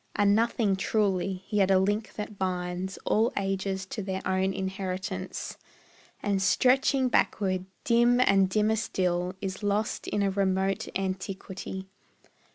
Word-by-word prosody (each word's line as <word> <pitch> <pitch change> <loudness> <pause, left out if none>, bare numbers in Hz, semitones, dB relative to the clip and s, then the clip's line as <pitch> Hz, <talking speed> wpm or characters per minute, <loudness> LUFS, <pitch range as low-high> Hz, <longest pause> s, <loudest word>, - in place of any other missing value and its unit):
A 205 - +2
nothing 215 0 +3
truly, 195 -2 0
yet 200 -2 +2
a 190 - +5
link 205 +3 0
that 210 -1 -6
binds 180 0 -2
All 225 +2 +3
ages 195 -1 -1
to 210 - -5
their 190 -1 -4
own 190 0 +1
inheritance, 190 -1 -4 0.6
And 200 -2 +1
stretching 260 +5 +3
backward, 190 -6 +1 0.2
dim 240 +1 +4
and 195 -6 +4
dimmer 215 +2 +2
still, 180 -3 -1
Is 190 -1 -4
lost 205 +1 -1
in 205 - 0
a 195 - +1
remote 190 0 0
antiquity. 190 0 -4
195 Hz, 130 wpm, -28 LUFS, 190-210 Hz, 0.6 s, a